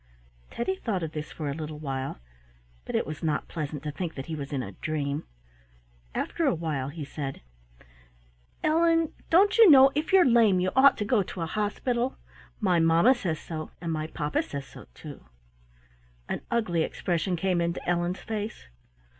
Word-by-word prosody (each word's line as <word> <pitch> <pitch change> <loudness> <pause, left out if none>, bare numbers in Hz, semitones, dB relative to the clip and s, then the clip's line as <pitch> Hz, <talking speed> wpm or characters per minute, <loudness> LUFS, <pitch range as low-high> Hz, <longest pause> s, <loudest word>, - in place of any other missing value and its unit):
Teddy 380 +11 -2
thought 200 - -2
of 160 - -4
this 150 -1 -6
for 155 - -5
a 140 - -1
little 155 0 -6
while, 135 -3 -4 0.7
but - - -4
it - - +1
was 155 +1 -6
not 155 -3 -1
pleasant 150 -2 -5
to 150 - -3
think 170 +2 -5
that 135 - -6
he 160 - -4
was 140 -2 -6
in 135 -3 -2
a 100 - -7
dream. 145 - -3 0.9
After 330 -3 -1
a 265 - +2
while 150 -5 -3
he 150 0 -6
said: 140 -1 -6 1.2
"Ellen, 330 0 +3 0.2
don't 395 +6 +4
you 445 -5 +10
know, 270 -2 +8
if 300 +5 -2
you're 380 -2 +7
lame 230 -7 +5
you 185 +1 0
ought 275 +1 +6
to 210 - -2
go 225 -1 +3
to 180 -1 -6
a - - 0
hospital? 235 +7 -1 0.4
My 185 -5 +2
mamma 165 +9 +5
says 175 -10 -2
so, 155 -2 -6
and 170 -2 -3
my 155 -1 -2
papa 150 -1 -1
says 140 -1 -6
so - - -13
too." - - -10 1.0
An - - -3
ugly 215 -8 +1
expression 175 +2 -1
came 180 0 0
into 170 +1 -2
Ellen's 175 +1 0
face. 215 - -5
170 Hz, 180 wpm, -27 LUFS, 155-235 Hz, 1.2 s, you